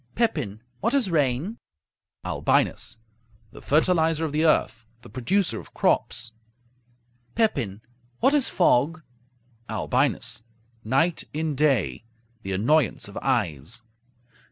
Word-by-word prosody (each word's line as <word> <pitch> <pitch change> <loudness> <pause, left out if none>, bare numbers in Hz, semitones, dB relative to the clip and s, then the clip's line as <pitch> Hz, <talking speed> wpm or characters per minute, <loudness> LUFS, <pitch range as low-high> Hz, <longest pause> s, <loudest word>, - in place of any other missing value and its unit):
Pepin 130 - -1 0.2
What 280 - +1
is 240 -10 +1
rain? 150 - 0 0.7
Albinus - - 0 0.5
The - - -12
fertilizer 160 +1 +2
of 155 - -3
the 155 +2 +1
earth; 120 -7 +1 0.2
the - - -13
producer 145 - 0
of - - -14
crops. 115 -2 +1 1.0
Pepin 135 - 0 0.4
What 265 +4 +4
is 280 -6 +2
fog? 160 -1 +2 0.7
Albinus 120 0 +1 0.4
Night 145 +9 +1
in 155 0 -1
day; 130 - +1 0.4
the 95 - -5
annoyance 120 +6 +1
of - - -12
eyes. 80 - -1
145 Hz, 105 wpm, -25 LUFS, 115-165 Hz, 1.0 s, What